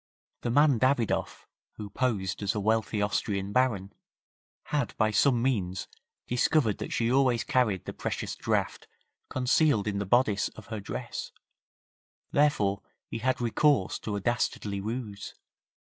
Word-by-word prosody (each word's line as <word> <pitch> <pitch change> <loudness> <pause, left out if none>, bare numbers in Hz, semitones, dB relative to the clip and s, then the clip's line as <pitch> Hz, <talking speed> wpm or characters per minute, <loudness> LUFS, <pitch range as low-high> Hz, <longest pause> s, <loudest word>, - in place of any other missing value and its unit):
The 120 - -2
man 140 0 +4
Davidoff, 130 -3 0 0.3
who 105 -2 -8
posed 100 -7 -1
as 100 0 0
a - - 0
wealthy 110 0 +1
Austrian 100 -1 -1
Baron, 105 -6 +1 0.7
had 150 -1 -2
by 110 -1 +2
some 120 +3 +3
means 100 -8 -1 0.4
discovered 125 -2 +2
that - - -5
she 115 0 +1
always 130 -3 +3
carried 110 -8 +1
the - - -5
precious - - -4
draft - - -1 0.4
concealed 130 -3 +2
in 100 -1 -1
the 100 - -3
bodice 110 -2 +3
of 110 - -11
her 110 - -3
dress, 100 - -5 1.0
therefore 105 -10 +2 0.3
he 115 - -4
had 130 +3 0
recourse 120 -1 +2
to 105 - -4
a - - -1
dastardly 105 -2 -1
ruse. 110 -1 -5
110 Hz, 140 wpm, -28 LUFS, 100-130 Hz, 1.0 s, man